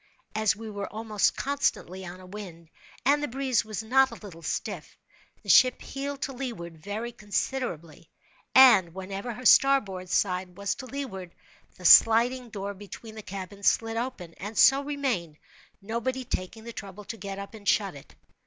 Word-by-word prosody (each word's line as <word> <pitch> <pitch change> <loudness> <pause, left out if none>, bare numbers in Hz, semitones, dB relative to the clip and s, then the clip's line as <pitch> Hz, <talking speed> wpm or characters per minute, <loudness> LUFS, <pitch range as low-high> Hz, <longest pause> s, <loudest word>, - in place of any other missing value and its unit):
As 215 -2 +2
we 225 +2 -8
were 205 -2 -5
almost 215 -1 0
constantly 260 -9 -1
on 180 0 -8
a 185 - -12
wind, 180 -4 -10 0.3
and 290 +2 +4
the 295 - -1
breeze 265 -1 0
was 215 0 -5
not 265 +4 +4
a 230 - -9
little 190 -7 -11
stiff, - - -4 0.5
the - - -17
ship 255 -1 +6
heeled 280 0 -5
to 270 - -3
leeward 185 -11 -6
very 210 +7 -5
considerably; 205 - -4 0.5
and 205 -10 +7
whenever 195 +5 -5
her 250 +3 -9
starboard 205 -10 +4
side 180 -1 0
was 200 0 -1
to 260 - -9
leeward, 210 -11 -6 0.4
the 180 - -12
sliding 235 +6 +6
door 200 -1 -5
between 205 +3 -10
the 220 - -8
cabins 200 0 -5
slid 225 0 +2
open, 230 -8 -4
and 205 +3 -7
so 270 +1 +6
remained, 260 - -2 0.5
nobody 250 +4 -3
taking 220 +2 -5
the 235 0 -8
trouble 200 0 -8
to 215 - -7
get 195 -1 -6
up 200 +2 -8
and 210 -2 -3
shut 200 -3 +2
it. 140 - -14
215 Hz, 170 wpm, -27 LUFS, 190-250 Hz, 0.5 s, and